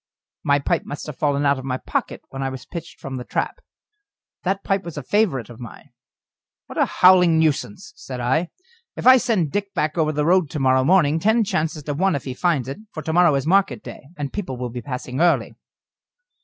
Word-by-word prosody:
My 140 0 +3
pipe 140 - 0
must 145 - -7
have 150 -3 -8
fallen 145 -1 +1
out 140 -1 +2
of - - -8
my 130 -1 -2
pocket - - -3
when 135 - -6
I 135 - -1
was 130 -1 -8
pitched 170 -2 -8
from 135 -4 -6
the 125 - -5
trap. - - -3 0.8
That 195 +1 -1
pipe 195 0 0
was 170 -3 -8
a 150 - -4
favourite 160 - +1
of 120 -1 -12
mine. 120 -3 -11 0.7
"What - - -6
a - - +5
howling 180 -3 +5
nuisance," 160 +5 -1
said 130 -2 -8
I. 130 +8 0 0.5
"If - - -6
I 255 +1 +9
send 205 - 0
Dick 200 -1 -3
back 155 +2 -1
over 155 -1 +2
the 150 -1 -1
road 180 -2 +3
to 150 - -4
morrow 130 -1 +3
morning, 160 -1 +3
ten 220 +6 +3
chances 155 -5 -2
to 145 - -3
one 185 +3 +1
if 140 - -3
he 130 - -5
finds 145 -3 0
it, 135 - -6
for 155 - -7
to 160 - -2
morrow 175 -3 +5
is 135 0 -1
market 195 +4 +2
day, 135 - -10
and 145 -2 -4
people 175 -11 -4
will 125 -1 -4
be 125 +1 -5
passing 125 +1 -4
early." 175 -1 +2
150 Hz, 220 wpm, -22 LUFS, 135-180 Hz, 0.8 s, I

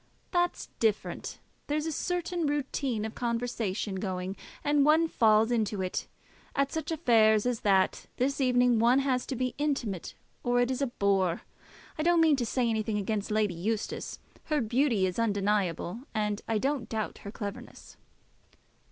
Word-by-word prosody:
"That's 350 -1 0
different. 220 -2 -1 0.3
There's 300 +1 -1
a 325 - -1
certain 350 0 -1
routine 270 -5 -1
of 220 - -5
conversation 230 -4 -2
going, 185 -1 -3 0.3
and 290 -1 +3
one 315 +3 +5
falls 220 -4 +4
into 215 -4 0
it. 185 - -3 0.5
At 280 0 +1
such 320 0 -3
affairs 225 -9 +4
as 245 -2 0
that 195 -2 +2
this 275 +3 0
evening 245 -2 +4
one 240 +3 +5
has 265 -2 +1
to 265 - -3
be 255 0 -1
intimate, 260 - -2 0.3
or 245 0 +2
it 245 +1 +2
is 260 - -2
a 275 - +2
bore. 195 -6 +1 0.6
I - - +2
don't 345 +1 +4
mean 320 -2 +5
to 240 -3 -1
say 250 +1 +1
anything 220 -1 0
against 205 0 -2
Lady 210 -3 +1
Eustace. 210 +6 -3 0.3
Her 305 -2 +1
beauty 235 -3 +2
is 185 +3 -2
undeniable, 200 -3 0 0.2
and 210 -1 0
I 225 - +1
don't 270 0 -1
doubt 220 -2 -3
her 200 - -8
cleverness." 205 -2 -8
235 Hz, 160 wpm, -29 LUFS, 210-275 Hz, 0.6 s, one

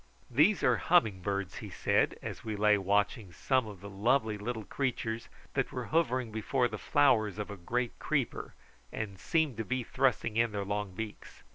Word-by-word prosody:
"These 155 - +4
are - - +4
humming 110 - +3
birds," 100 -3 -2
he - - -7
said, - - +1
as - - -6
we 110 -1 -3
lay 105 0 +4
watching 100 +1 0
some 130 - +1
of 100 -4 -10
the 100 - -8
lovely 110 +2 +2
little 110 +2 -4
creatures 115 -3 -2 0.2
that - - 0
were - - -4
hovering 130 -8 +1
before 120 +4 +1
the - - -6
flowers 110 -8 +3
of 105 0 -4
a - - -5
great 120 +6 -2
creeper, 145 -6 -2 0.4
and 100 -4 -5
seemed 155 - +1
to 110 - -1
be 125 +4 -2
thrusting 120 -3 0
in 115 -1 +2
their 100 -1 -2
long 100 -1 -3
beaks. 110 0 -7
110 Hz, 180 wpm, -31 LUFS, 100-125 Hz, 0.4 s, These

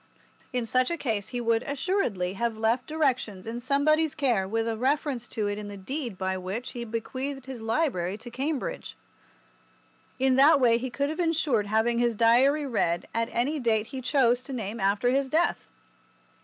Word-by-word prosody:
In 250 -3 -1
such 255 +3 +2
a 340 - -2
case 220 -9 -2
he 245 - -4
would 230 -1 +2
assuredly 270 - -1
have 230 +2 -2
left 225 +3 +1
directions 255 -11 -1
in 230 +2 -4
somebody's 290 +4 +2
care 240 -10 +1
with 225 +3 -1
a 225 - -1
reference 265 0 -1
to 215 -2 -2
it 205 0 -2
in 210 - -6
the 205 0 -8
deed 240 +1 -5
by 190 0 -2
which 210 +8 -5
he 240 - -5
bequeathed 260 +4 -4
his 260 -3 -7
library 220 - 0
to 240 +2 -11
Cambridge. 275 +3 -3 1.2
In 260 0 +2
that 285 +2 +7
way 235 -2 +4
he 260 +2 -3
could 280 +3 -1
have 315 - -5
ensured 310 - +1
having 220 +3 +1
his 240 -1 +2
Diary 255 +7 +4
read 175 -9 0
at 230 0 0
any 280 +6 0
date 220 -4 +1
he 265 - -4
chose 250 -2 +2
to 265 +1 -8
name 225 -2 -4
after 200 +5 +2
his 270 0 +1
death. 330 +5 0
240 Hz, 185 wpm, -27 LUFS, 220-275 Hz, 1.2 s, that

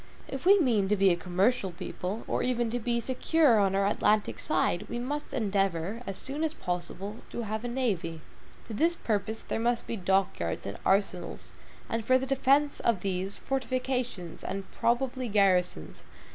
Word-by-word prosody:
If 270 +5 -4
we 400 +1 +8
mean 230 - +2
to 210 - +3
be 195 -1 +4
a - - +3
commercial 190 +5 +1
people, 185 +3 -5
or - - 0
even 240 -2 0
to 245 - -1
be 235 +1 0
secure 260 +1 +3
on 195 -1 +2
our 195 0 +2
Atlantic 210 +1 +2
side, - - 0
we 240 - -3
must 290 +5 -4
endeavor, 195 -2 0
as 195 - -2
soon 285 +4 -3
as 320 -1 -1
possible, 180 +4 -4
to 235 - -4
have 220 +1 -3
a - - -2
navy. 200 -11 -2 0.4
To 225 - -8
this 330 +9 +2
purpose 220 - -2
there - - -3
must 235 +1 0
be - - -3
dock 190 0 +1
yards 85 -1 -3
and 100 - -5
arsenals; 195 -2 0 0.4
and 230 0 -2
for 255 +3 +4
the 260 - -2
defense 275 +2 +2
of 225 -6 +1
these, 190 +1 -2
fortifications, 255 -8 -2
and 195 +1 -4
probably 255 +1 0
garrisons. 185 - +1
220 Hz, 175 wpm, -29 LUFS, 195-255 Hz, 0.4 s, we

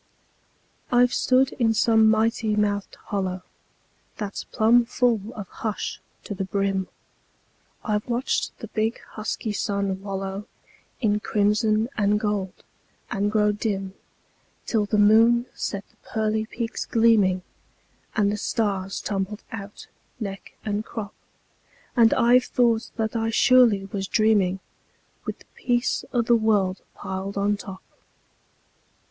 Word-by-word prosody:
I've 245 0 +4
stood 260 +1 +3
in 225 -2 +3
some 220 -1 +5
mighty 220 0 +2
mouthed 205 -1 -1
hollow 185 -2 -3 0.7
That's 205 -2 -5
plumb 235 +2 +4
full 240 -2 +1
of 205 -3 -6
hush 215 +1 -4 0.2
to - - -5
the 195 0 -3
brim; 195 -1 -1 1.0
I've 210 -1 -1
watched 245 +1 -1
the - - -9
big, 220 +1 -1
husky 215 0 -3
sun 200 -2 -1
wallow 195 +1 -4 0.5
In 210 -3 +2
crimson 215 +1 +1
and 205 0 +3
gold, 205 -3 -3 0.5
and 205 +1 0
grow 210 -1 +3
dim, 200 -2 -3 0.7
Till 215 -3 0
the 210 - +1
moon 225 +3 +5
set 200 -1 -4
the - - -32
pearly 220 0 -2
peaks 235 0 -4
gleaming, 210 -5 +3 0.7
And 205 -2 +2
the 210 - -2
stars 195 -3 -1
tumbled 200 +1 -3
out, 200 -2 -8 0.3
neck 195 -4 -6
and 210 0 -1
crop; 215 -3 -6 0.8
And 230 -3 +6
I've 245 +1 +5
thought 235 -2 +1
that 220 0 -2
I 225 0 0
surely 225 -4 +5
was 195 0 -4
dreaming, 200 -4 +2 0.6
With - - -4
the - - -20
peace 245 0 0
o' 240 -2 +2
the 235 +1 +4
world 205 -4 +1
piled 190 +1 -5
on 205 +1 +2
top. 195 -2 -9
210 Hz, 130 wpm, -24 LUFS, 200-225 Hz, 1.0 s, And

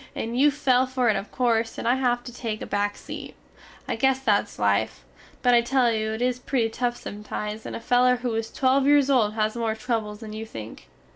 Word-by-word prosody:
and 230 +1 -3
you 295 +2 +6
fall 260 -3 +2
fer 255 -2 +1
it 215 - +3
of 195 +2 -4
corse, 230 -3 0
and - - -3
I 240 - +5
have 245 -2 0
to 245 - -9
take 225 -3 -4
a - - -4
back 205 0 -1
seat. - - -8 0.5
I - - -1
guess 265 +3 +2
that 210 -6 +2
is - - -15
life, 100 - 0 0.4
but 245 - +5
I 240 - +6
tell 245 0 +2
you 220 -1 -1
it 220 +3 -2
is 250 0 0
pretty 245 -3 0
tuf 240 +1 -1
sometimes 210 +1 -6
and - - -5
a - - -4
feler 250 +2 +3
who 245 -1 -3
is 225 0 -2
twelve 270 +1 +2
yeres 285 -1 +5
old 220 -5 +2
has 215 0 0
more 225 -2 -1
trubbles 220 -2 -3
than 215 -1 -8
you 215 +1 -5
think. 110 - -9
230 Hz, 230 wpm, -25 LUFS, 215-250 Hz, 0.5 s, you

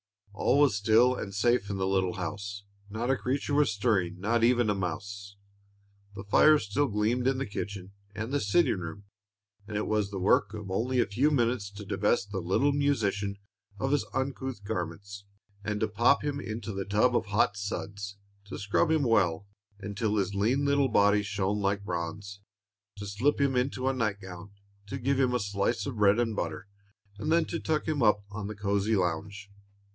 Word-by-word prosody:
All 120 - +2
was 145 -7 +4
still 110 +5 +4
and 100 -5 -6
safe 120 -1 +2
in 100 - -2
the 95 - -1
little 95 -1 +1
house. 100 +2 -5 0.3
"Not 115 +5 -1
a 135 - +2
creature 135 +4 -2
was 145 -4 +3
stirring, 100 -5 0
not 115 +4 +1
even 120 -1 +4
a 105 - +2
mouse." 100 +2 -5 0.8
The 95 - -7
fire 155 +9 +6
still 140 +4 0
gleamed 110 +3 0
in 135 -1 +2
the 135 - -2
kitchen 100 -2 -6 0.2
and 110 +3 -4
the 145 - +1
sitting 125 - +2
room, 90 +4 -7 0.6
and 105 -1 -4
it 105 - -1
was 105 -2 0
the 100 - -5
work 105 +2 +2
of 105 -3 -7
only 125 +6 0
a - - +4
few 120 +9 +1
moments 120 -7 0
to 100 +1 -9
divest 100 +1 0
the 95 - -2
little 95 +11 +2
musician 105 -9 0 0.4
of 135 +5 -1
his 145 -4 +2
uncouth 130 -3 -3
garments, 100 0 -5 0.4
to 105 +1 0
pop 120 +7 +3
him 145 -1 -2
into 110 -4 -5
the 95 0 -3
tub 110 +5 +2
of - - 0
hot 105 0 +2
suds, 100 0 -5 0.3
to 100 - -7
scrub 105 +10 +1
him 160 -2 +2
well, 100 -7 +2 0.4
until 105 +2 -2
his 100 -1 0
lean 120 +8 +1
little 140 -1 +3
body 105 -1 +4
shone 105 0 -1
like 100 0 0
bronze, 100 +3 -5 0.6
to 100 - -6
slip 110 +10 0
him 140 -2 +2
into 130 +1 0
a 135 - +2
night 105 -6 -1
gown, 95 0 -9 0.4
to 135 - -4
give 135 +1 0
him 125 -2 +2
a - - +1
slice 100 +2 -1
of 135 -5 -5
bread 105 0 +4
and 115 -2 0
butter, 100 0 -4 0.5
and 155 - -2
then 165 0 +4
to 170 - -4
tuck 155 -1 -1
him 155 -3 0
up 105 -2 +3
on 105 -1 -5
the 105 - -6
cozy 100 +1 0
lounge. 100 +3 -2
105 Hz, 190 wpm, -29 LUFS, 100-125 Hz, 0.8 s, fire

